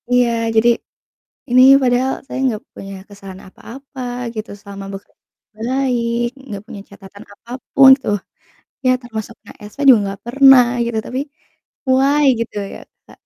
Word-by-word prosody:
Iya, 245 -1 +3 0.3
jadi 225 +2 +4 0.8
ini 255 +1 +6 0.2
padahal 255 +1 +1
saya - - -6
enggak 235 -5 -1
punya 195 0 -9
kesalahan 195 -2 -12
apa-apa 265 +7 -12 0.3
gitu, 215 0 -6
selama 200 -1 -10
bekerja 195 0 -11 0.4
baik 240 0 -1 0.2
enggak 205 -7 -8
punya 205 - -9
catatan 200 +1 -14
apapun 255 +5 +2
tuh, 205 - 0 0.7
ya 255 - +4
termasuk 225 -2 -7
kena - - -15 0.2
SP - - -21
juga 245 -4 +7
enggak 195 0 -6
pernah 270 0 +6 0.2
gitu, 235 -1 -3
tapi 255 - -4 0.7
why 275 +3 +3
gitu 230 - -5 0.2
ya - - -9 0.3
Kak, - - -18
235 Hz, 140 wpm, -17 LUFS, 205-260 Hz, 0.8 s, juga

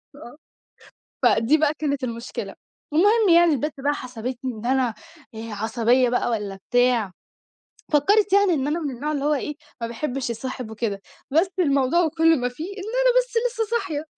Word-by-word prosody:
آه، 285 -3 -12 0.9
فدي 230 +8 +4
بقى 305 -1 +2
كانت 285 -3 -2
المشكلة 235 -1 -5 0.4
والمهم 410 +6 +4
يعني 340 -1 +6
البت 295 +3 -2
بقى 285 +2 0
حسبتني 255 0 -5
إن 220 +1 -9
أنا 260 0 +2 0.5
آآ، 225 +1 -7
عصبية 235 +4 +2
بقى 245 - 0
والّا 205 -3 -3 0.2
بتاع، 245 -5 +2 0.8
فكّرِت 395 +7 +3
يعني 400 -2 +5
إن 280 -3 -1
أنا 310 +3 -1
من 295 -4 -3
النوع 295 +5 -3
اللي 285 -2 -2
هو 300 - +3
إيه 295 +1 -3 0.3
ما 230 - -2
باحبش 250 +2 -3
يصاحب 235 0 -5
وكده، 210 -3 -3 0.3
بس 325 +7 +3
الموضوع 285 +1 +2
كلّه 325 0 +5
وما 245 -1 -1
فيه 280 +6 -7
إن 400 +2 -8
أنا - - +1
بس - - -2 0.2
لسه 460 -2 -2
صاحية، 330 -9 -4
275 Hz, 170 wpm, -23 LUFS, 240-325 Hz, 0.9 s, يعني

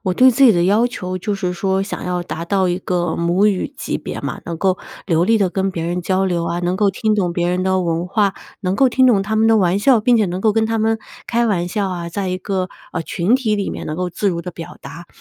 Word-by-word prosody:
我 185 -2 -1
对 255 +6 +6
自 250 - +1
己 250 - +8
的 175 -1 +2
要 210 +6 +3
求 185 -7 -5
就 205 +3 -2
是 185 -3 -2
说 190 +2 0
想 195 - -5
要 180 -1 -2
达 170 -1 -5
到 190 0 +1
一 175 +1 0
个 175 -3 -1
母 175 +4 +2
语 205 +6 0
级 - - -3
别 - - -6
嘛， - - -5
能 170 -1 -4
够 185 +1 +1 0.3
流 165 0 +2
利 225 +3 +3
地 195 -3 +1
跟 195 +1 -1
别 165 -3 -4
人 175 +1 -2
交 190 +2 0
流 175 -2 0
啊， 170 +1 -2
能 180 +1 -1
够 205 0 +3
听 215 +3 0
懂 185 -4 0
别 175 0 0
人 180 +1 0
的 190 0 +1
文 170 0 -1
化， 200 0 +1 0.3
能 185 +1 -1
够 265 +4 +4
听 260 +1 +3
懂 210 -6 +4
他 215 +2 -2
们 220 +1 +3
的 225 0 +5
玩 185 -1 +2
笑， 245 +1 +4
并 240 +3 +3
且 215 - +3
能 180 +1 -3
够 215 0 +3
跟 225 0 +2
他 225 0 -1
们 225 +1 +1 0.3
开 235 0 +1
玩 175 -4 0
笑 200 +1 -1
啊， 170 -2 -4
在 190 +2 -3
一 185 0 -2
个， 185 -1 -2 0.2
呃， 170 - -2
群 180 +8 0
体 235 -5 +1
里 200 - -2
面 - - -6
能 155 - -4
够 180 0 -2
自 200 +4 -1
如 170 -3 -2
地 180 - -6
表 170 0 -10
达。 170 +1 -10
190 Hz, 300 characters per minute, -19 LUFS, 175-210 Hz, 0.3 s, 己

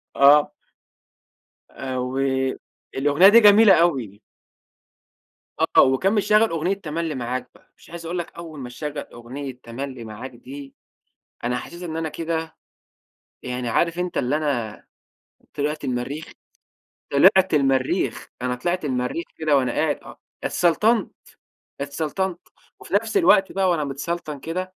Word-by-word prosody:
آه. 145 +2 +6 1.2
آآ 130 -1 -5
و 125 - -5 0.8
الأغنية 145 +7 +5
دي 230 +2 +8
جميلة 210 -1 +7
أوي. 130 - +1 1.4
آه، - - +5
وكان 135 +10 +3
مشغّل 215 +1 +3
أغنية 165 +4 0
"تملي 165 -4 -4
معاك" 125 +1 -4
بقى، - - -24
مش - - -19
عايز 170 0 -8
أقول 175 +2 -3
لك 175 - -4
أول 160 -4 -8
ما 125 -2 -6
شغّل 145 +4 -6 0.2
أغنية 130 +2 -8
"تملي 130 +1 -6
معاك" 115 +4 -8
دي 135 +3 -11 0.7
أنا 125 +1 0
حسيت 170 +8 -8
إن 160 -2 -5
أنا 160 -1 -2
كده، 160 0 -4 0.9
يعني 125 -1 -3
عارف 170 +8 +1
أنت 180 -1 -2
اللي 140 +5 +1
أنا 120 -8 -3 0.7
طلعت 150 +2 -2
المريخ، 130 +5 -4 0.8
طلعت 190 +4 +5
المريخ، 135 -2 +1
أنا 125 0 -1
طلعت 175 +6 -2
المريخ 130 +4 -2
كده 155 -3 +2
وأنا 130 -2 +1
قاعد - - 0
آه - - -13 0.2
اتسلطنت، 210 +5 +2 0.7
اتسلطنت، 160 +6 -2 0.4
وفي - - -11
نَفس 410 - +1
الوقت 195 - +4
بقى 190 -1 +1
وأنا 165 -4 +1
متسلطن 145 +2 -4
كده 185 +4 -4
150 Hz, 135 wpm, -23 LUFS, 130-175 Hz, 1.4 s, دي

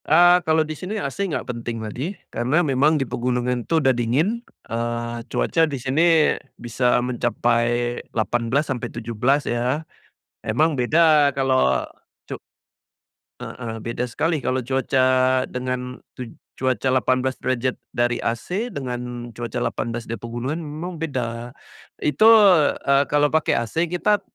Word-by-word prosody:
Eee, 175 +2 +6
kalau 160 0 +3
di 155 - -5
sini, 185 +8 -5
AC 200 -1 -3
nggak 155 - -3
penting 120 -1 -5
ladi. 125 - -5 0.2
Karena 140 +9 +1
memang 145 +3 +3
di 135 - 0
pegunungan 125 0 -1
itu 165 - +3
udah 135 -4 +3
dingin. 140 - 0 0.2
Eee, 120 0 -3
cuaca 165 -1 +1
di 140 - -3
sini, 155 +5 +3 0.2
bisa 120 +1 +1
mencapai 120 0 0
18 120 +5 0
sampai 120 -1 -5
17 120 +5 0
ya? 125 +6 -1 0.6
Emang 145 +5 +1
beda 155 +2 +5
kalau 135 -1 +2 0.4
cu - - -7 1.0
Heeh. 115 -2 -6
Beda 115 +2 -3
sekali 160 +7 -1
kalau 130 0 0
cuaca, 130 0 +2
dengan 125 0 -4 0.2
tuj 125 -2 -7 0.2
cuaca 130 0 0
18 130 0 0
derajat 130 0 -1
dari 120 0 0
AC, 180 - -2
dengan 125 - -6
cuaca 120 +2 -5
18 120 -1 -3
di 115 - -5
pegunungan 120 +7 -4
memang 160 +2 -6
beda. 120 -6 -3 0.5
Itu, 150 +10 +4 0.6
eee, 140 0 +4
kalau 145 0 +2
pakai 160 -1 +2
AC 160 +9 -1
kita, 200 +4 +1
130 Hz, 135 wpm, -22 LUFS, 120-155 Hz, 1.0 s, Eee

